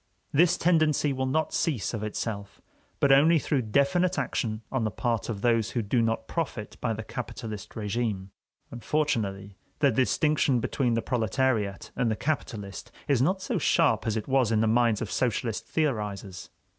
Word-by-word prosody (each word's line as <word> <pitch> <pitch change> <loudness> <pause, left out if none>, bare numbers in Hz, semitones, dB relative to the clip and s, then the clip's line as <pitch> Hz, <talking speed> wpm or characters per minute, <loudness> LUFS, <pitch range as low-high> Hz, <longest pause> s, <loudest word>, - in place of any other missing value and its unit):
This 175 +4 +4
tendency 155 -4 +2
will 130 0 -1
not 155 +4 0
cease 130 - 0
of 110 - -3
itself, 105 -1 -4 0.4
but 140 - +4
only 155 +5 +6
through 145 -2 0
definite 140 - +2
action 115 -4 -2
on 130 -3 0
the 110 - +1
part 115 +3 -2
of 105 -4 -4
those 115 -2 +2
who 120 - -2
do 115 +4 +1
not 115 0 -1
profit 140 -10 -4
by 115 - 0
the 110 +1 -5
capitalist 110 -3 -7
régime. 105 -2 -2 0.4
Unfortunately 110 -7 -2 0.2
the 140 -2 +3
distinction 130 +3 +2
between 120 +1 0
the 115 - -1
proletariat 115 -4 0
and 120 - +1
the 110 - 0
capitalist 110 -8 -4 0.2
is 140 -4 +3
not 190 +7 +1
so - - -1
sharp - - +2
as 110 0 0
it 110 - -4
was 130 -4 +2
in 110 -1 +3
the - - +3
minds 115 -1 +2
of 110 - -6
socialist 115 -2 -1
theorizers. 105 - -2
120 Hz, 170 wpm, -27 LUFS, 110-140 Hz, 0.4 s, only